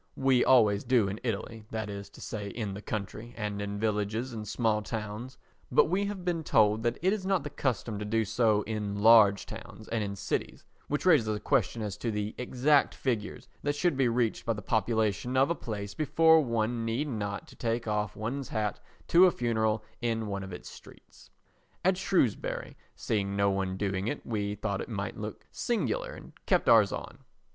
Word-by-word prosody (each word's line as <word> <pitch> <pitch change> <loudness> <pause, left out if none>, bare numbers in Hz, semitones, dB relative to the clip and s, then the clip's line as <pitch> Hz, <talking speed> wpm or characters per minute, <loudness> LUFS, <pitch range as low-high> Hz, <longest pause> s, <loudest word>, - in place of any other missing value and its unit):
We 135 -2 +4
always 105 -6 +5
do 120 -5 +3
in 100 +3 -4
Italy, 110 -1 -4
that 110 -1 -3
is 100 -1 -7
to - - -15
say 105 -2 -5
in 105 -2 -4
the 100 - -7
country 110 +3 -5
and 105 -2 -3
in 100 0 -4
villages 110 +3 -1
and 110 -2 -6
small 110 0 +1
towns, 110 +3 -5 0.3
but - - +5
we 195 +4 +1
have 195 -3 -5
been 170 -2 0
told 110 -5 +3
that 120 +1 0
it 190 +2 +4
is 210 -3 -3
not 190 -4 +1
the 145 - -6
custom 120 -6 -2
to - - -3
do 110 +1 +1
so 110 0 +2
in 105 -2 -3
large 105 -1 +6
towns 110 -1 -10
and 115 -2 0
in 100 -1 -4
cities, - - -3 0.2
which 145 +4 -2
raises 155 -11 +5
a 105 -1 -1
question 110 +1 +1
as 105 -2 -4
to 120 - -3
the 105 0 -2
exact 130 +4 +2
figure 115 -6 -2 0.2
that 145 0 -1
should 175 +1 +1
be 135 -2 +3
reached 120 -1 0
by 115 - 0
the 105 -2 -7
population 110 +3 0
of 135 +4 +4
a - - +4
place 105 -9 -5
before 160 +5 +5
one 115 -1 -1
need 115 +6 -1
not 105 -6 -4
take 115 0 -1
off 105 -1 -1
one's 125 +5 -4
hat 105 -2 -2 0.3
to 180 +2 +7
a - - +3
funeral 110 -4 0 0.2
in 115 -2 -1
one 100 -1 -3
of 95 0 -7
its 90 - -8
streets. - - -15 0.6
At 190 0 +4
Shrewsbury 180 - 0 0.2
seeing 100 -2 -1
no 100 0 +3
one 95 -1 -1
doing 100 0 -1
it - - -3
we 105 -2 -2
thought 100 -1 -2
it - - -7
might 100 -3 -3
look 105 0 -7
singular - - -1
and - - -12
kept - - +2
ours - - +6
on. - - -6
110 Hz, 195 wpm, -29 LUFS, 105-125 Hz, 0.6 s, to